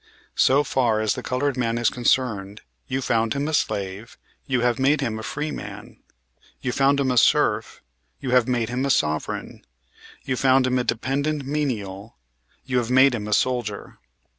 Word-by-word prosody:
So 140 +3 +4
far 120 -5 +1
as 110 -1 +1
the - - -5
colored 130 +2 -1
man 115 -2 -1
is 120 - +2
concerned, 110 -5 0 0.3
you 135 0 -2
found 115 -2 +1
him 140 +1 -1
a 155 - -3
slave; 100 -3 -2 0.3
you 130 -3 +1
have 120 0 +1
made 140 +3 +3
him 115 -5 -2
a - - -6
free 150 +7 -4
man. 105 +3 -8 0.6
You 125 - -2
found 140 +2 +2
him 135 -2 +1
a 125 - 0
serf; - - +1 0.4
you 130 - -4
have 125 -1 +4
made 120 -3 0
him 125 +2 -2
a 140 - 0
sovereign. 80 - -1 0.6
You 130 - -2
found 130 0 +4
him 130 0 +1
a - - 0
dependent 140 +5 -1
menial; 110 -9 -3 0.5
you 125 -1 +1
have 120 -1 -3
made 130 +1 +5
him 105 -3 -4
a 105 - -1
soldier. 120 -4 -1
125 Hz, 180 wpm, -23 LUFS, 110-135 Hz, 0.6 s, made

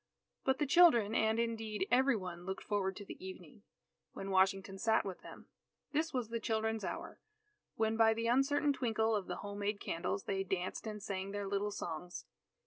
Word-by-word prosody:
But 265 0 +2
the 295 - +1
children 265 -9 +6
and 220 0 +2
indeed 220 -4 -1
every 265 +1 +5
one 180 -4 -5
looked 190 +1 -5
forward 195 -2 -1
to 205 - -8
the - - -9
evening, 185 -1 -9 0.5
when 195 0 -5
Washington 195 0 +2
sat 225 +1 +2
with 190 -2 -5
them. - - -11 0.5
This 315 +2 0
was 250 -4 -2
the 230 0 -2
children's 220 0 -1
hour, - - -5 0.6
when 220 0 +1
by 225 -1 +5
the 230 +1 -2
uncertain 280 +4 +3
twinkle 225 -4 +1
of 200 -3 -2
the - - -3
home 205 0 -5
made 205 0 -1
candles, 180 +4 -2
they 195 -1 -1
danced 185 +3 -3
and 210 -2 -5
sang 195 -1 -3
their 205 -1 -3
little 200 +1 0
songs. 175 -3 -5
210 Hz, 185 wpm, -35 LUFS, 195-230 Hz, 0.6 s, children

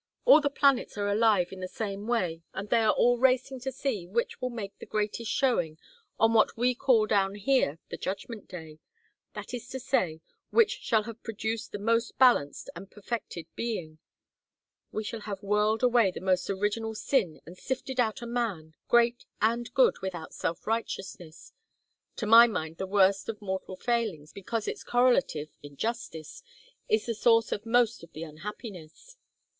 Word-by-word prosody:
All - - +8
the 285 - +1
planets 275 -5 +2
are 205 0 -1
alive 205 -3 +3
in 190 - -8
the 185 - -4
same 205 +1 -5
way, 180 -9 0
and 200 +1 -6
they 235 - +5
are 220 -1 +4
all 245 0 +3
racing 260 +1 +2
to 265 +2 -4
see 225 -11 -3
which 235 +7 -2
will 255 - -1
make 215 -5 -6
the - - -10
greatest 215 +1 -2
showing 175 - +1 0.4
on 225 0 +4
what 220 0 +3
we 250 +2 +2
call 240 -3 +3
down 200 -2 +1
here 205 - +1
the - - -5
Judgment 200 +3 -5
Day 160 -4 -10 0.6
that - - -7
is 245 - -6
to 265 - -5
say, 180 -11 0 0.3
which 450 -2 +3
shall 220 -2 +1
have 230 +1 -9
produced 225 0 -4
the - - -4
most 230 +3 0
balanced 240 - +3
and 190 +3 -9
perfected 210 -5 -6
being; 175 -10 -4 0.9
which 215 - -4
shall 230 - -4
have 205 -2 -6
whirled 210 +3 +1
away 240 -5 +4
the 180 - -6
most 185 -1 0
original 210 +3 -1
sin 215 - 0
and 180 +2 -12
sifted 260 0 -4
out 240 +1 0
a - - -4
man, 220 -10 -3
great 240 0 +3
and 230 +2 0
good - - +4
without 175 -4 -5
self 165 - -3
righteousness 195 -7 -5 0.6
to 225 - -3
my 230 +2 +9
mind 160 -7 -4
the 190 - -4
worst 195 +1 +3
of 215 -2 -4
mortal 190 -2 -4
failings 215 - -2
because 210 +3 -4
its - - -4
correlative, 245 - +2
injustice, 160 - -5 0.5
is 215 0 +2
the 235 - -1
source 230 0 +3
of 210 +2 -3
most 235 -1 +2
of 170 - -14
the 155 - -6
unhappiness. 195 - -9
215 Hz, 170 wpm, -28 LUFS, 190-240 Hz, 0.9 s, my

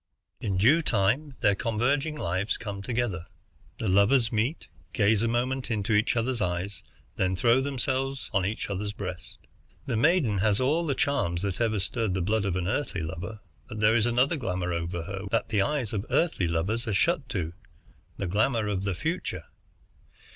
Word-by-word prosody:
"In 100 -4 -1
due 135 - +5
time 130 +4 +1
their 105 -3 +4
converging 135 +8 0
lives 95 - -1
come 100 -3 -6
together. 105 -6 -2 0.5
The 110 - -3
lovers 105 +6 +4
meet, 120 +8 -1 0.3
gaze 105 -2 +3
a 115 - +2
moment 125 +3 -1
into 110 -1 0
each 105 +3 +3
other's 120 0 0
eyes, 90 +1 -2 0.4
then 95 0 +1
throw 120 +6 +4
themselves 135 0 -2
each 105 +4 -2
on 100 - -3
the - - -4
other's 105 0 -3
breast. 90 -4 -6 0.5
The 125 - -1
maiden 125 - +3
has 105 +1 +3
all 155 +6 +1
the 140 - +1
charms 100 -14 0
that 100 +1 -2
ever 110 -2 +1
stirred 100 0 0
the 95 - 0
blood 105 +2 +1
of 95 -3 0
an 90 -1 -1
Earthly 105 - -1
lover, 90 +7 -6 0.3
but 110 - -6
there 105 +1 +4
is 115 0 +3
another 125 +7 +2
glamour 90 -8 -2
over 85 0 -3
her 100 +2 -5
which 115 - +2
the 105 -3 +2
eyes 135 -4 -1
of 100 -2 -1
Earthly 160 - +1
lovers 95 +9 -1
are 105 - 0
shut 165 - +1
to, 85 -6 -2 0.6
the 100 - -2
glamour 110 +5 +1
of 100 -1 -2
the 100 -2 -1
future. 165 - -3
110 Hz, 185 wpm, -27 LUFS, 95-130 Hz, 0.6 s, due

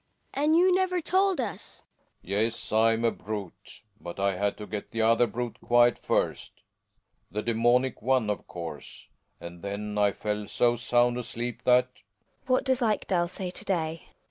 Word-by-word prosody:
Hedvig. 280 - -1
And 310 +2 +4
you 365 +2 +5
never 365 -1 +1
told 375 +1 +2
us! 230 -6 -5 0.4
Relling. - - -16
Yes, 110 +3 -1
I'm 115 +1 +3
a 115 - +3
brute 105 -4 -8
— 105 - -34
but 85 +2 -8
I 100 -1 +1
had 100 +2 -1
to 105 - -7
get 105 0 -6
the 115 -1 -1
other 115 +2 +4
brute 120 +1 -5
quiet 120 0 +4
first - - -2 0.3
— - - -46
the 105 +3 -3
daemonic 120 +3 +2
one, 130 -1 +2
of 105 -1 -3
course 85 -4 -8
— - - -47
and 85 0 -10
then 105 +1 -4
I 100 -1 +4
fell 105 0 -3
so 120 +3 +2
sound 120 0 +2
asleep 120 0 -5
that 125 0 +4
GiNA. 105 - -28 0.4
What 255 0 +2
does 260 -1 +1
Ekdal 195 -6 +1
say 185 0 -5
to - - -6
day 165 -3 -2
120 Hz, 185 wpm, -27 LUFS, 105-170 Hz, 0.4 s, you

